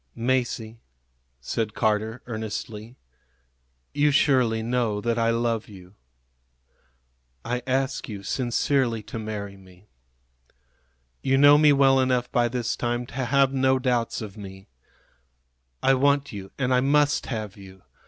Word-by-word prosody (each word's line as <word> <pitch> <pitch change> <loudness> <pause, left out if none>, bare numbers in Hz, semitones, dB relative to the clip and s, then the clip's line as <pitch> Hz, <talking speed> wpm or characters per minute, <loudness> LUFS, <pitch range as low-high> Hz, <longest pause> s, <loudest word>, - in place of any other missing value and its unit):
"Masie," 120 -2 -1 0.6
said 110 - -3
Carter, 110 +1 -1
earnestly, 110 0 -6 1.0
"you 145 +1 +3
surely 130 -6 +2
know 115 -3 0
that 115 +2 -1
I 115 0 +2
love 115 -1 -1
you. 95 -2 -14 1.5
I 125 +1 -2
ask 135 0 -1
you 100 -2 -7
sincerely 120 0 0
to 115 - -7
marry 105 -2 -6
me. 95 +1 -19 1.3
You 135 0 +2
know 145 +1 +7
me 150 -1 +6
well 135 -1 +4
enough 125 -1 0
by 120 -1 +2
this 120 -1 -2
time 120 0 -2
to - - -15
have 135 +1 +2
no 130 0 +2
doubts 125 -3 -1
of 105 -1 -9
me. 95 -1 -11 1.1
I 135 - +5
want 140 +1 +2
you, 95 -2 -8
and 130 -1 0
I 125 - +4
must 145 +2 +2
have 110 -5 -5
you. 95 -2 -14
120 Hz, 135 wpm, -25 LUFS, 110-130 Hz, 1.5 s, know